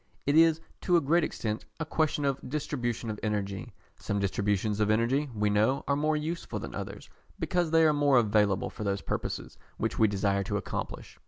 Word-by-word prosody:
It 145 - +2
is 165 0 +6 0.2
to 175 -2 +4
a - - +5
great 165 +3 +2
extent 110 -7 -3
a 160 - -2
question 155 -2 0
of 140 -1 0
distribution 120 -6 -2
of 105 - -6
energy. 100 -2 -2 0.3
Some 100 - -2
distributions 100 +1 0
of 105 -1 +2
energy, 120 +7 +2
we 105 0 +1
know, 110 +6 +2
are 140 - +2
more 155 +1 +1
useful 160 +3 -4
than - - -6
others, - - -6 0.3
because 175 -3 0
they 165 0 +5
are 155 -1 +5
more 145 -2 +4
available 105 -3 +2
for - - -6
those 100 -1 -1
purposes - - -4 0.2
which - - -2
we 110 - +6
desire 100 -1 +1
to - - -1
accomplish. - - -5
120 Hz, 190 wpm, -29 LUFS, 105-150 Hz, 0.3 s, is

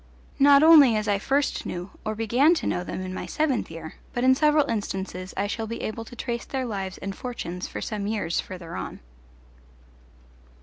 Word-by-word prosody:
Not 280 +1 +7
only 300 -7 +8
as 215 -1 -1
I 200 -1 +2
first 275 +6 0
knew 180 +2 -5
or 215 0 -2
began 245 +9 +3
to - - -3
know 180 - -1
them 185 - -5
in 185 0 -5
my - - -5
seventh 300 -5 0
year, 165 -1 -8 0.2
but 245 - -1
in 260 0 +6
several 300 +1 +3
instances 190 -4 -3
I 200 - +1
shall 220 +2 -3
be 230 - -5
able 225 +1 -4
to 245 - -11
trace 235 0 -3
their 265 -2 -3
lives 195 -5 -4
and 195 0 -5
fortunes 180 -8 -5
for - - -6
some 205 -2 -3
years 205 -6 -1
further 175 -2 -7
on. - - -6
220 Hz, 190 wpm, -25 LUFS, 190-260 Hz, 0.2 s, only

